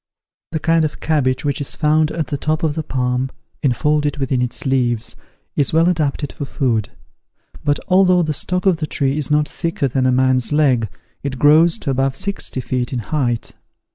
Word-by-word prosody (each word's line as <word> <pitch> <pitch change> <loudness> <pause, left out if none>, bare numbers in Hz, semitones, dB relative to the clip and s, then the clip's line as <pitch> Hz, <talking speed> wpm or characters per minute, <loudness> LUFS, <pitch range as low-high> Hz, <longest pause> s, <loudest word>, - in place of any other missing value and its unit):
The 160 - -1
kind 165 +1 +2
of 155 - -3
cabbage 145 -4 0
which 145 0 -1
is 140 - -3
found 155 0 +2
at 160 -1 -2
the 140 - -3
top 155 +4 -1
of 155 -2 +1
the 160 - -2
palm, 125 -2 -1 0.3
enfolded 150 +2 +1
within 135 -2 0
its 125 +3 -3
leaves, 120 -4 0 0.4
is 145 - +1
well 165 +2 +4
adapted 155 -4 -1
for 145 - -5
food; 120 -6 -1 0.7
but, 145 0 +2
although 185 -1 +4
the 155 -1 -1
stock 180 +6 0
of 185 -4 +4
the 155 -1 -3
tree 140 -2 0
is 150 -4 0
not 150 0 +2
thicker 165 -4 -2
than 130 0 0
a - - +3
man's 130 0 +2
leg, 130 -8 +2 0.3
it 135 -2 -4
grows 160 - +5
to 145 - -3
above 135 0 0
sixty 200 -9 -3
feet 125 0 -2
in 130 - -2
height. 120 -6 0
145 Hz, 190 wpm, -19 LUFS, 130-155 Hz, 0.7 s, grows